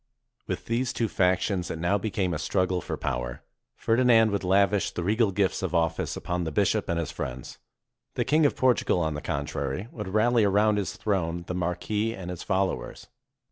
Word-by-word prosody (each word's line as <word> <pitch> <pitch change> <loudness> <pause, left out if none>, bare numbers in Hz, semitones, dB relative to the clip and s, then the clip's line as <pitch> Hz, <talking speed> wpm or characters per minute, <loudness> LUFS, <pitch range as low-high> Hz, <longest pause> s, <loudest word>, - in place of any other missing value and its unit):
With - - -4
these 120 +2 -1
two 115 - 0
factions 90 -1 +1
it - - -4
now 85 +5 +1
became 95 -3 -1
a 75 - -2
struggle 90 +2 0
for - - -4
power. - - -3 0.3
Ferdinand 115 -2 +4
would 100 -1 -1
lavish 100 +2 +3
the 85 - -4
regal 110 +4 +2
gifts 95 0 0
of 95 -2 -2
office 80 -1 0
upon 90 0 -2
the 80 - -3
bishop - - +1
and 85 - 0
his 85 -3 -2
friends. 65 0 -6 0.6
The - - 0
Kjng 155 0 +4
of - - -3
Portugal, 125 -7 +2
on 80 -2 0
the 75 - -5
contrary, 70 - -3
would 105 -4 -6
rally 110 +4 +3
around 105 +1 +3
his 100 - -4
throne 85 -5 -1
the 90 - -4
mar 90 -1 -1
quis 110 +4 -2
and 90 -2 -6
his 90 - -6
followers. 95 -1 -2
95 Hz, 190 wpm, -27 LUFS, 85-110 Hz, 0.6 s, Ferdinand